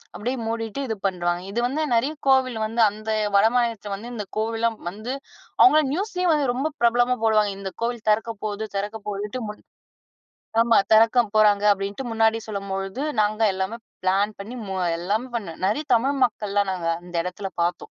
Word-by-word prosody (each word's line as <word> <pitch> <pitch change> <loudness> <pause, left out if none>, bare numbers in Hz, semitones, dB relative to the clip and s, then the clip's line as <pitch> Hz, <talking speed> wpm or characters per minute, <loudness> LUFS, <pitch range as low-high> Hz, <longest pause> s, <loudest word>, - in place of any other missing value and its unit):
அப்படியே 250 +5 -2
மூடிட்டு 225 +2 -3
இது 220 - -2
பண்றுவாங்க. 175 -2 0
இது 225 - -1
வந்து 285 +5 -2
நெறைய 260 +7 +2
கோவில் 260 -3 +3
வந்து, 225 +2 0
அந்த 215 +2 -8 0.3
வடமாநிலத்தில 225 -1 +2
வந்து 230 +5 -8
இந்த 210 -3 -4
கோவில்லாம் 225 +1 0
வந்து 215 +7 -6 0.5
அவுங்கள்லாம் 305 -6 +6
நியூஸ்லேயும் 365 -1 0
வந்து 285 -4 +1
ரொம்ப 265 +5 -1
பிரபலமா 240 +1 +3
போடுவாங்க. 215 -2 +3
இந்த 195 -1 -5
கோவில் 235 -1 -3
தெறக்க 225 +2 +1
போகுது! 215 +1 -3
திறக்க 205 +3 -2
போகுதுன்ட்டு 210 +4 -4
முன் 210 - -8 1.0
ஆமா. 235 0 +4 0.2
"தெறக்க 225 +3 +6 0.2
போறாங்க." 210 -1 +4
அப்படீன்ட்டு 200 +6 -4
முன்னாடி 225 0 +3
சொல்லும்பொழுது, 195 +3 -4 0.2
நாங்க 215 +1 +1
எல்லாமே 190 +5 -3 0.3
பிளான் 200 +3 +1
பண்ணி 215 +5 -7
மு 190 - -3 0.2
எல்லாமே 210 +8 -1
பண்ணேன். 180 -8 -6
நெறைய 290 +10 0
தமிழ் 270 +5 +2
மக்கள்லாம் 205 -4 0
நாங்க 170 -2 -3
அந்த 180 0 -13
எடத்துல 190 +2 -5
பார்த்தோம். 175 +1 +1
220 Hz, 160 wpm, -24 LUFS, 200-240 Hz, 1.0 s, அவுங்கள்லாம்